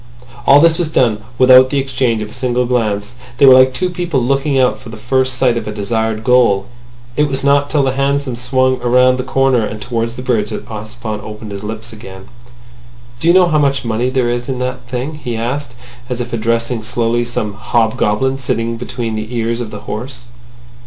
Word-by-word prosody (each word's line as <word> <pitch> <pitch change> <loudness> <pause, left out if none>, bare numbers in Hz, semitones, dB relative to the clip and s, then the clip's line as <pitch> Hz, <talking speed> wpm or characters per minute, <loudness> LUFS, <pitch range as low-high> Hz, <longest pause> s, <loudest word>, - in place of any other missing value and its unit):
All 140 +1 +8
this 165 +1 +4
was 175 - +1
done 115 -8 +1 0.2
without 130 0 +7
the 140 - -1
exchange 130 -5 0
of 105 - -9
a - - -11
single 125 -1 -1
glance; 110 -3 -1 0.2
they 140 - +5
were 130 - +9
like 130 0 +6
two 180 +7 -2
people 175 -5 -1
looking 135 +3 0
out 130 -1 +2
for 125 - -12
the 110 - -9
first 130 +3 0
sight 125 -3 +2
of 115 - -4
a - - -3
desired 110 +1 -2
goal. 115 -6 +3 0.5
It 150 0 +2
was 135 -1 -2
not 140 0 +3
till 145 -2 +2
the 135 - +1
hansom 140 -1 -1
swung 130 +1 +1
round 125 +1 +3
a - - -1
corner 130 -1 +2
and 110 0 -5
towards 115 0 -3
the 125 - -7
bridge 110 -5 0
that 110 - -6
Ossipon 110 0 -6
opened 105 0 -9
his 100 0 -7
lips 110 +2 -6
again. 95 -3 -11 0.9
"Do 160 - -1
you 170 - +6
know 185 -1 +6
how 155 -1 +2
much 140 -3 +1
money 115 +2 0
there 130 -2 0
is 120 +2 -2
in 130 - -2
that 125 -1 -5
thing?" 130 +5 -4
he 120 -2 -3
asked, 125 +2 -4 0.3
as 125 -1 -3
if 120 0 -5
addressing 115 +1 -1
slowly 120 +1 0
some 115 -3 -3
hobgoblin 115 +3 0
sitting 115 -2 -2
between 120 -1 -4
the 110 +3 -5
ears 115 +1 -1
of 115 - -5
the 105 -1 -8
horse. 120 +3 -7
125 Hz, 205 wpm, -16 LUFS, 115-130 Hz, 0.9 s, were